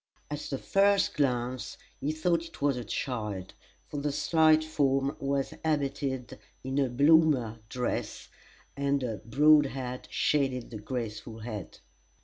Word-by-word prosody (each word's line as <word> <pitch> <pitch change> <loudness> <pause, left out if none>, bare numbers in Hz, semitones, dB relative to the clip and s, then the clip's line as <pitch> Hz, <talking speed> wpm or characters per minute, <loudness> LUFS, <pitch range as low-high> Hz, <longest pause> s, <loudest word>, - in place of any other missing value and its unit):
At 150 - -2
the 135 - -2
first 200 +6 +3
glance 125 -3 -1 0.2
he 145 - -1
thought 165 +2 +1
it 165 - -12
was 140 -2 +2
a 125 - -4
child, 105 -5 -4 0.3
for 145 - -7
the 145 +1 -1
slight 155 +1 +4
form 140 -3 +1
was 140 0 -1
habited 140 -5 -2 0.2
in 135 +2 -1
a 135 -2 +2
Bloomer 140 -4 +4
dress, 125 -1 -3 0.5
and 140 -1 0
a 115 -4 -2
broad 145 +7 +5
hat 125 -2 -6
shaded 135 -5 0
the 110 - -6
graceful 115 -1 -5
head. 110 -4 -7
135 Hz, 135 wpm, -29 LUFS, 125-150 Hz, 0.5 s, broad